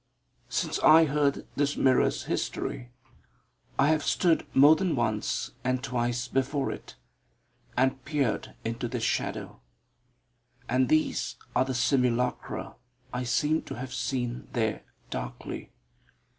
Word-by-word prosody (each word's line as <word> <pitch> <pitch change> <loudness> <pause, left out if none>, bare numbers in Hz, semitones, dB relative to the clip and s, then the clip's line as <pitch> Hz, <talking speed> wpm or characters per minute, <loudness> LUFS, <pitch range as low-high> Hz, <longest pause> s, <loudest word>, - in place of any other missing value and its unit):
Since - - -1
I 160 +1 +7
heard 145 -1 +1
this 145 0 0
mirror's 130 -1 +3
history, 120 - -3 0.9
I 140 - +4
have 155 -1 +3
stood 170 -3 +2
more 145 +4 +8
than 180 -2 0
once 110 -4 -1
and 130 0 0
twice 120 -1 -1
before 135 +2 0
it, - - -9 0.8
and 130 0 +2
peered 140 -5 -1
into 115 +2 -2
this 120 -1 -3
shadow. 115 - -2 1.1
And 130 0 +2
these 155 0 +1 0.2
are 130 - +4
the 130 -1 -3
simulacra 125 -1 0 0.4
I 125 0 -2
seem 150 +6 +2
to - - -7
have 130 +1 -6
seen 120 -1 -2
there 110 -3 0 0.3
darkly. - - -6
130 Hz, 120 wpm, -28 LUFS, 120-145 Hz, 1.1 s, more